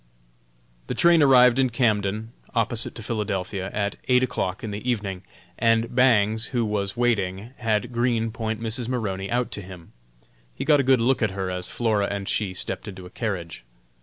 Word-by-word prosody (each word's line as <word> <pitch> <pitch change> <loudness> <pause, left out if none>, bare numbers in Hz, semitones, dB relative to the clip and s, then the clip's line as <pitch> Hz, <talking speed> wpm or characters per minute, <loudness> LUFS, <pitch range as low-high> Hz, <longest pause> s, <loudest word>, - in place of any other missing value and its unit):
The - - -3
train 170 -1 +5
arrived 125 -2 +6
in 130 -1 +3
Camden, 110 -2 0 0.2
opposite 115 0 0
to 115 - -8
Philadelphia, 100 -3 -3
at 100 -1 -2
eight 125 0 +4
o'clock 95 -6 -2
in 110 - -4
the 105 +5 -4
evening, 100 -6 -2 0.4
and 115 0 +2
Bangs, 110 -3 +3
who 120 -3 -1
was 105 0 -2
waiting, 105 -3 0
had 110 -1 0
Green 120 -1 0
point 110 -1 -3
Mrs. 115 +1 -3
Maroney 100 -6 -2
out 120 0 0
to 105 - -5
him. 90 -3 -12 0.6
He - - -4
got 150 -2 +5
a 135 -1 0
good 130 -3 +5
look 130 +3 +2
at 110 - +2
her 95 -1 -2
as 90 0 -4
Flora 110 -4 0
and 100 -1 -4
she 95 -4 -1
stepped 95 +2 -4
into 95 -2 -8
a 90 - -12
carriage. 90 - -4
110 Hz, 180 wpm, -24 LUFS, 100-120 Hz, 0.6 s, arrived